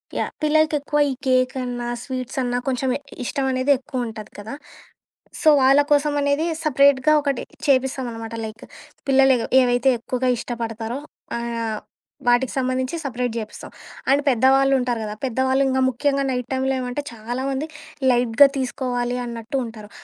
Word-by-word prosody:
Yeah! -, -, -1 dB
పిల్లలకెక్కువ 300 Hz, -1 st, +2 dB
ఈ -, -, -1 dB
cake 255 Hz, -1 st, +2 dB
అన్నా 245 Hz, -1 st, -4 dB
sweets 255 Hz, 0 st, -5 dB
అన్నా 245 Hz, -1 st, -1 dB
కొంచెం 265 Hz, 0 st, 0 dB
ఎ -, -, -18 dB, 0.2 s
ఇష్టం 275 Hz, +2 st, -2 dB
అనేది 255 Hz, +2 st, +1 dB
ఎక్కువ 255 Hz, -1 st, -4 dB
ఉంటాది 220 Hz, -2 st, -9 dB
కదా! 205 Hz, +2 st, -7 dB, 0.9 s
సో, 315 Hz, -, +6 dB
వాళ్ళ 270 Hz, +2 st, +6 dB
కోసం 295 Hz, 0 st, +3 dB
అనేది 285 Hz, +3 st, +1 dB, 0.2 s
సెపరేట్‌గా 280 Hz, 0 st, +4 dB
ఒకటి 280 Hz, -3 st, -1 dB, 0.3 s
చేపిస్తాం 265 Hz, -1 st, +2 dB
అనమాట. 225 Hz, 0 st, -7 dB
లైక్ 220 Hz, 0 st, -9 dB, 0.4 s
పిల్లలెగు 265 Hz, -3 st, +4 dB, 0.2 s
ఏవైతే 245 Hz, +1 st, +3 dB
ఎక్కువగా 255 Hz, +2 st, -2 dB
ఇష్టపడతారో 230 Hz, +1 st, -4 dB, 0.4 s
ఆహ్, 230 Hz, -2 st, -3 dB, 0.5 s
వాటికి 245 Hz, +1 st, +3 dB
సంబంధించి 255 Hz, +2 st, -1 dB
సెపరేట్ 245 Hz, -3 st, -2 dB
జేపిస్తాం. 215 Hz, -1 st, -8 dB, 0.4 s
అండ్ 280 Hz, -, +4 dB
పెద్దవాళ్ళుంటారు 260 Hz, -1 st, +3 dB
గదా! 210 Hz, 0 st, -5 dB
పెద్దవాళ్ళు 260 Hz, +2 st, +1 dB
ఇంకా 260 Hz, 0 st, +1 dB
ముఖ్యంగా 275 Hz, +2 st, 0 dB
నైట్ 250 Hz, -1 st, -2 dB
టైంలో 265 Hz, +1 st, 0 dB
ఏమంటే 250 Hz, +3 st, -3 dB
చాలామంది 260 Hz, +6 st, -3 dB, 0.4 s
లైట్‌గా 245 Hz, +2 st, +5 dB
తీసుకోవాలి 250 Hz, -1 st, -2 dB
అన్నట్టు 235 Hz, +2 st, -4 dB
ఉంటారు. 220 Hz, -2 st, -10 dB
255 Hz, 140 wpm, -22 LUFS, 240-270 Hz, 0.9 s, సో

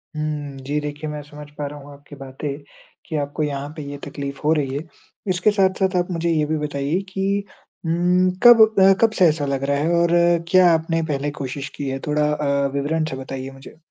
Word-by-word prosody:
हुँ, 150 Hz, -2 st, -4 dB
जी 145 Hz, +2 st, -1 dB
देखिए, 150 Hz, +1 st, -5 dB
मैं 150 Hz, 0 st, -5 dB
समझ 150 Hz, 0 st, -12 dB
पा 145 Hz, -, -3 dB
रहा 145 Hz, +1 st, -9 dB
हूँ 145 Hz, +1 st, -13 dB
आपकी 145 Hz, +1 st, -14 dB
बातें 135 Hz, +2 st, -6 dB, 0.6 s
कि 160 Hz, -, -5 dB
आपको 145 Hz, +1 st, -2 dB
यहाँ 145 Hz, -1 st, -3 dB
पे -, -, -5 dB
ये 145 Hz, -, -6 dB
तकलीफ 140 Hz, 0 st, -6 dB
हो 155 Hz, +2 st, +4 dB
रही 140 Hz, -3 st, -1 dB
है। 145 Hz, -, -3 dB, 0.5 s
इसके 180 Hz, +4 st, +2 dB
साथ-साथ 190 Hz, -1 st, +1 dB
आप 175 Hz, -, -1 dB
मुझे 170 Hz, -1 st, -1 dB
ये 155 Hz, -2 st, +2 dB
भी 155 Hz, +1 st, -1 dB
बताइए 150 Hz, +3 st, -1 dB
कि 195 Hz, +1 st, -1 dB, 0.4 s
उम, 180 Hz, +2 st, +2 dB
कब 240 Hz, -2 st, +9 dB, 0.2 s
अ, 195 Hz, 0 st, +7 dB
कब 225 Hz, -1 st, +5 dB
से 185 Hz, -, +7 dB
ऐसा 150 Hz, -1 st, -1 dB
लग 140 Hz, -1 st, -2 dB
रहा 140 Hz, 0 st, +1 dB
है 155 Hz, +3 st, 0 dB
और 170 Hz, 0 st, +2 dB, 0.4 s
क्या 185 Hz, -1 st, +6 dB
आपने 165 Hz, 0 st, 0 dB
पहले 145 Hz, +1 st, -2 dB
कोशिश 135 Hz, +1 st, -5 dB
की 140 Hz, -2 st, -4 dB
है? 135 Hz, 0 st, -3 dB
थोड़ा 150 Hz, 0 st, +1 dB
अ, 140 Hz, -2 st, 0 dB
विवरण 150 Hz, +3 st, 0 dB
से 130 Hz, -, -4 dB
बताइए 130 Hz, 0 st, -6 dB
मुझे। 135 Hz, +3 st, -14 dB
150 Hz, 210 wpm, -21 LUFS, 140-165 Hz, 0.6 s, कब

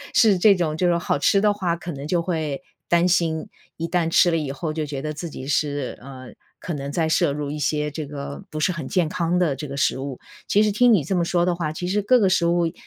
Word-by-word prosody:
是 205 Hz, -5 st, +5 dB
这 200 Hz, +1 st, +6 dB
种 160 Hz, -4 st, -1 dB
就 180 Hz, +3 st, +1 dB
是 170 Hz, -, +3 dB
好 170 Hz, -4 st, -1 dB
吃 195 Hz, +7 st, +3 dB
的 210 Hz, 0 st, +3 dB
话， 180 Hz, -4 st, -1 dB
可 175 Hz, +1 st, -7 dB
能 140 Hz, -1 st, -7 dB
就 170 Hz, +1 st, 0 dB
会 160 Hz, -4 st, -3 dB, 0.3 s
担 170 Hz, +1 st, +4 dB
心， 165 Hz, -3 st, 0 dB, 0.3 s
一 165 Hz, -, -4 dB
旦 165 Hz, -1 st, 0 dB
吃 175 Hz, +1 st, +4 dB
了 165 Hz, -, +1 dB
以 150 Hz, -3 st, -3 dB
后 155 Hz, +3 st, -4 dB
就 155 Hz, -, -2 dB
觉 140 Hz, -2 st, -4 dB
得 155 Hz, +1 st, -4 dB
自 165 Hz, +2 st, -6 dB
己 130 Hz, -, -8 dB
是， 145 Hz, -2 st, -1 dB
呃， 130 Hz, 0 st, -10 dB, 0.3 s
可 175 Hz, -, -5 dB
能 140 Hz, -1 st, -5 dB
在 160 Hz, +2 st, 0 dB
摄 145 Hz, -, +2 dB
入 145 Hz, -1 st, -4 dB
一 150 Hz, -, -5 dB
些 150 Hz, 0 st, -1 dB
这 150 Hz, 0 st, -5 dB
个 140 Hz, 0 st, -7 dB
不 155 Hz, -, -5 dB
是 185 Hz, -, +2 dB
很 165 Hz, -6 st, -5 dB
健 180 Hz, -5 st, +1 dB
康 170 Hz, +1 st, 0 dB
的 165 Hz, -7 st, +1 dB
这 150 Hz, +2 st, -6 dB
个 140 Hz, -, -6 dB
食 135 Hz, -1 st, +1 dB
物。 135 Hz, -2 st, -6 dB, 0.3 s
其 210 Hz, -, +4 dB
实 210 Hz, -, +2 dB
听 240 Hz, +3 st, +4 dB
你 175 Hz, -, +3 dB
这 190 Hz, -, -3 dB
么 175 Hz, -, +2 dB
说 175 Hz, 0 st, +1 dB
的 180 Hz, -, +1 dB
话， 165 Hz, -3 st, -3 dB
其 175 Hz, -, -5 dB
实 205 Hz, +3 st, +1 dB
各 250 Hz, +5 st, +4 dB
个 195 Hz, -4 st, +3 dB
食 185 Hz, -2 st, +2 dB
物 170 Hz, -1 st, +2 dB
165 Hz, 290 characters per minute, -23 LUFS, 145-180 Hz, 0.3 s, 这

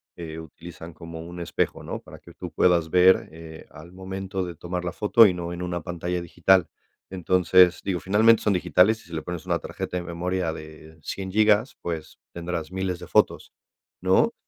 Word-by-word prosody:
eh, 80 Hz, -1 st, -7 dB
utilizan 80 Hz, +1 st, -11 dB
como 85 Hz, -1 st, -9 dB
un 85 Hz, +1 st, -9 dB
espejo, 85 Hz, -, -2 dB
¿no?, -, -, -5 dB
para -, -, -13 dB
que -, -, -16 dB
tú -, -, -8 dB
puedas 85 Hz, -3 st, +2 dB
ver, 90 Hz, +2 st, +4 dB
eh, 80 Hz, 0 st, -11 dB
al 80 Hz, +3 st, -13 dB
momento 95 Hz, 0 st, -5 dB
de 85 Hz, -2 st, -6 dB
tomar 90 Hz, +2 st, -5 dB
la 90 Hz, -, -2 dB
foto, 105 Hz, +3 st, +5 dB
y 90 Hz, -, 0 dB
no 85 Hz, 0 st, -5 dB
en 85 Hz, -, -6 dB
una 90 Hz, -1 st, -3 dB
pantalla 90 Hz, 0 st, -3 dB
digital. 90 Hz, +1 st, +2 dB, 0.4 s
Entonces, 90 Hz, 0 st, +4 dB
digo, 90 Hz, -3 st, -1 dB
finalmente 110 Hz, +4 st, +4 dB
son 105 Hz, -, +2 dB
digitales, 90 Hz, +5 st, +3 dB
y -, -, -19 dB
sí -, -, -11 dB
le 80 Hz, -, -3 dB
pones 90 Hz, -2 st, -6 dB
una -, -, 0 dB
tarjeta 90 Hz, -, -5 dB
de 90 Hz, -, -4 dB
memoria 90 Hz, 0 st, -2 dB
de 80 Hz, 0 st, -11 dB
100 95 Hz, -1 st, -5 dB
gigas, 110 Hz, +3 st, +3 dB
pues 80 Hz, -2 st, -5 dB, 0.2 s
tendrás 85 Hz, -1 st, -5 dB
miles 95 Hz, -1 st, -2 dB
de -, -, -10 dB
fotos, -, -, +1 dB, 0.5 s
¿no?, -, -, +3 dB
90 Hz, 190 wpm, -25 LUFS, 85-95 Hz, 0.5 s, foto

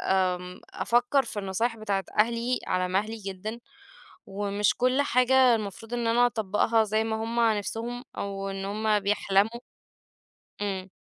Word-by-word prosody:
آآ، 180 Hz, -1 st, -1 dB
أفكر 245 Hz, +3 st, +2 dB
في -, -, -6 dB
النصايح 225 Hz, +5 st, -1 dB
بتاعة 200 Hz, -3 st, -2 dB
أهلي 235 Hz, +3 st, +2 dB
على 185 Hz, 0 st, 0 dB
مهلي 210 Hz, +5 st, -1 dB
جدًا، 205 Hz, +2 st, -6 dB, 0.7 s
ومش 200 Hz, +1 st, 0 dB
كل 255 Hz, +3 st, +2 dB
حاجة 255 Hz, -1 st, +4 dB
المفروض 220 Hz, +2 st, -6 dB
إن 240 Hz, -1 st, -1 dB
أنا 240 Hz, +2 st, +4 dB
أطبقها 220 Hz, 0 st, +1 dB
زي 215 Hz, +1 st, 0 dB
ما 220 Hz, 0 st, -1 dB
هُم 235 Hz, +1 st, -1 dB, 0.2 s
نفسهم 235 Hz, +4 st, -4 dB
أو 195 Hz, 0 st, -3 dB
إن 195 Hz, 0 st, -5 dB
هُم 210 Hz, +1 st, +1 dB
بيحلموا. 205 Hz, +3 st, +1 dB, 1.0 s
امم. 190 Hz, -2 st, -3 dB
215 Hz, 135 wpm, -27 LUFS, 195-235 Hz, 1.0 s, حاجة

